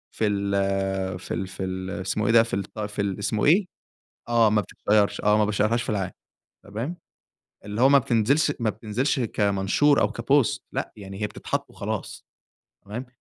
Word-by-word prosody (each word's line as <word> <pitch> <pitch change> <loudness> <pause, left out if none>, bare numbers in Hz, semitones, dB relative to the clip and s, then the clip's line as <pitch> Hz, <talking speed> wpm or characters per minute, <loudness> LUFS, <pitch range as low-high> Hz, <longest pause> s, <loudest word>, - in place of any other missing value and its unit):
في 110 - +1
ال 95 -2 -1
في 90 - -6
ال 95 +2 -3
في 95 - -6
ال 95 0 -4
اسمه 95 +3 -1
إيه - - +3
ده، 115 -1 +7
في 115 - -8
الط 100 +2 -5
في 105 -1 -3
ال 100 -1 -2
اسمه 105 +1 0
إيه؟ 185 +7 +5 0.6
آه، 115 -2 +5
ما 105 0 +3
بتتشيّرش 105 +2 +1
آه، 105 0 +4
ما 105 - +3
باشيّرهاش 105 +3 +1
في - - -6
العام، 95 -3 -1 0.5
تمام، 115 - -5 0.7
اللي 105 +3 -3
هو 135 - +7
ما 140 - +7
بتنزلش 130 +6 +2
ما 115 -2 +1
بتنزلش 115 +7 -1
كمنشور 105 +5 +2
أو 105 - +2
كبوست 120 +2 +1
لأ، - - -3
يعني 95 0 -9
هي 105 - +1
بتتحط - - -4
وخلاص - - -5 0.6
تمام، 110 +6 -6
105 Hz, 175 wpm, -25 LUFS, 100-115 Hz, 0.7 s, ده